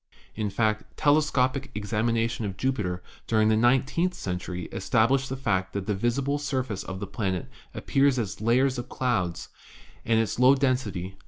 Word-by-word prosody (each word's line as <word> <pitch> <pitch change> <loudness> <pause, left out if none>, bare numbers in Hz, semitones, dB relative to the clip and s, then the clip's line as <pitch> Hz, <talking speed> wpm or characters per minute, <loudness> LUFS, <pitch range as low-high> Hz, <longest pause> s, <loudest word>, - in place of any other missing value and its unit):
In 105 -1 -2
fact, 110 +1 -1
telescopic 140 -2 +2
examination 115 +2 0
of 100 -2 -4
Jupiter 100 -9 -1 0.2
during 110 -1 +3
the 110 - +4
nine 120 +3 +4
teenth 175 +6 -1
century 90 - -4
established 120 +7 +1
the 135 - -3
fact 95 -8 -1
that 100 -1 -3
the 105 - 0
visible 130 +7 0
surface 130 -8 -2
of 95 0 -6
the 100 - -4
planet 95 -2 -3 0.3
appears 135 -1 +2
as 110 -3 -3
layers 125 +3 +2
of 120 +1 -7
clouds, 100 -10 -1 0.5
and 115 0 +2
its 115 0 -1
low 130 +2 +7
den 135 -2 +3
sity, 95 -7 -5
1. 95 - -23
115 Hz, 170 wpm, -26 LUFS, 100-130 Hz, 0.5 s, low